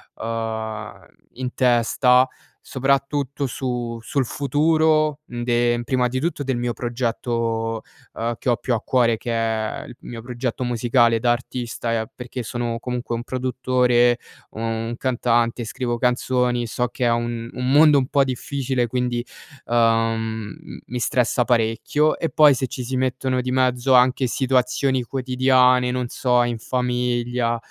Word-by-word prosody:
uhm, 110 -1 -5 0.3
in 125 0 -5
testa, 125 +1 +3 0.4
soprattutto 140 +1 0
su 120 -2 -3
sul 130 +3 -1
futuro 155 +3 +2
de 120 -1 0
prima 125 -2 +1
di 130 - -2
tutto 155 0 -2
del 135 -2 -1
mio 120 0 -1
progetto, 115 -2 -2 0.3
ehm, 115 +1 -2
che 130 - -2
ho 120 - +3
più 120 - -2
a 110 - -1
cuore, 120 -3 +2
che 120 - -5
è 115 +2 -1
il 125 -4 -11
mio 115 -1 -8
progetto 125 +1 -3
musicale 120 -1 +2
da 120 0 +3
artista, 120 -1 -3
ehm, 110 - -6
perché 125 0 -6
sono 120 0 -3
comunque 125 -1 -3
un 115 - -4
produttore, 125 -1 +2 0.3
un 115 +1 -3
cantante, 120 -2 +1
scrivo 120 +1 -3
canzoni. 125 0 +1
So 125 +2 -1
che 125 +1 -3
è 120 - +3
un 120 0 -2
un 125 +1 -2
mondo 150 0 +6
un 130 - -1
po' 140 0 +3
difficile 130 -1 -2
quindi, 125 0 -2 0.4
ehm, 115 -2 0
m - - -10
mi 125 - -4
stressa 120 0 +1
parecchio 120 +6 +1
e 165 - -1
poi 150 -2 +6
se 130 0 -2
ci 125 - -6
si 130 +2 -3
mettono 130 0 0
di 125 0 -2
mezzo 130 0 +2
anche 125 +1 +4
situazioni 130 0 +1
quotidiane, 130 0 +3
non 125 -1 -2
so 125 -1 +2
in 120 -1 -2
famiglia, 125 -1 -1
125 Hz, 145 wpm, -22 LUFS, 115-130 Hz, 0.4 s, mondo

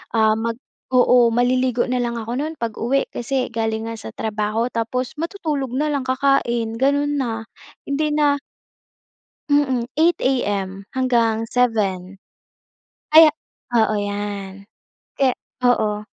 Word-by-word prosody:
Ah, 220 -1 +4
mag 230 +1 -2 0.3
oo, 250 -2 +5
maliligo 250 +1 +2
na 250 0 0
lang 235 0 -2
ako 230 +1 -6
no'n 315 +2 -3
'pag-uwi 230 +4 -1
kasi 255 +2 -1
galing 225 -1 -2
nga 230 - -5
sa 110 - -8
trabaho 215 +2 -1
tapos 245 +4 -2
matutulog 310 - -3
na 300 +3 +1
lang 280 -3 -1
kakain, 240 -4 +1
ganon 285 +2 +2
na, 225 -3 -3 0.4
hindi 300 +2 0
na 290 -1 +3 1.1
Mm, 265 -4 +2
8 335 +2 +3
AM 200 -7 -1
hanggang 230 -4 +1
7. 195 -6 0 0.9
Aya 320 -1 +10 0.4
oo 220 -2 +2
'yan. 200 -1 -5 0.5
Kaya 265 -2 +3 0.3
oo. 210 -3 +1
240 Hz, 120 wpm, -21 LUFS, 220-270 Hz, 1.1 s, Aya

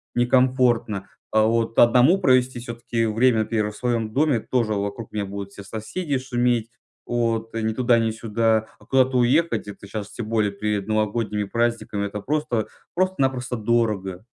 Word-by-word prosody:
некомфортно. 120 -4 +2 0.2
А, 110 0 +4
вот 115 0 0
одному 125 +10 +6
провести, 130 -6 +3
все-таки 120 -1 -3
время, 115 +2 +3
во-первых, 110 -1 -1
в - - -11
своем 115 -3 -1
доме, 145 -2 +2
тоже 115 -1 0
вот 100 -1 -1
вокруг 110 +2 -7
меня 105 -1 -2
будут 100 0 -7
все 100 - -11
соседи 135 - -3
шуметь. 120 -3 0 0.4
Вот, 115 -1 -1
и 115 - -2
ни 110 0 0
туда 120 0 +3
ни 115 -1 +1
сюда. 110 0 0
А - - -19
куда-то 130 -1 +2
уехать, 135 +4 +2
это 100 0 -10
щас 105 0 -6
тем 115 - -6
более 110 -3 +1
перед 105 0 -2
новогодними 110 0 0
праздниками, 115 -2 -1
это 105 +1 -6
просто 145 -5 -1 0.3
просто-напросто 135 -9 0
дорого. 105 -5 0
115 Hz, 165 wpm, -23 LUFS, 105-125 Hz, 0.4 s, одному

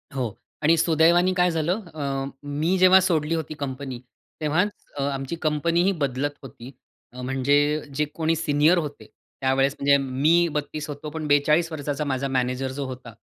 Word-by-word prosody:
हो. 130 -2 -1 0.4
आणि 160 +2 +5
सुदैवाने 170 +3 +4
काय 180 -1 +2
झालं? 170 +6 -1
अ, 140 -3 -3 0.2
मी 150 +6 0
जेव्हा 185 +1 +7
सोडली 165 -2 +1
होती 155 -1 -4
कंपनी 130 -2 -5 0.4
तेव्हाच 160 +7 +1 0.3
अ, - - -2
आमची 135 +2 -3
कंपनी 160 +3 +1
ही 195 - +3
बदलत 140 +2 -1
होती. 125 0 -11 0.5
म्हणजे 135 +2 +1 0.4
जे 150 +2 +1
कोणी 165 0 +1
सीनियर 155 +2 +3
होते 150 -4 -4 0.4
त्यावेळेस 135 +1 +2
म्हणजे 140 0 +4
मी 145 +6 +2
32 150 +1 -4
होतो, 145 +1 -6
पण 155 0 -5
42 150 +3 +3
वर्षाचा 145 -1 -3
माझा 135 0 -1
मॅनेजर 130 0 -1
जो 140 +1 -4
होता 125 -2 -8
145 Hz, 160 wpm, -24 LUFS, 135-165 Hz, 0.5 s, जेव्हा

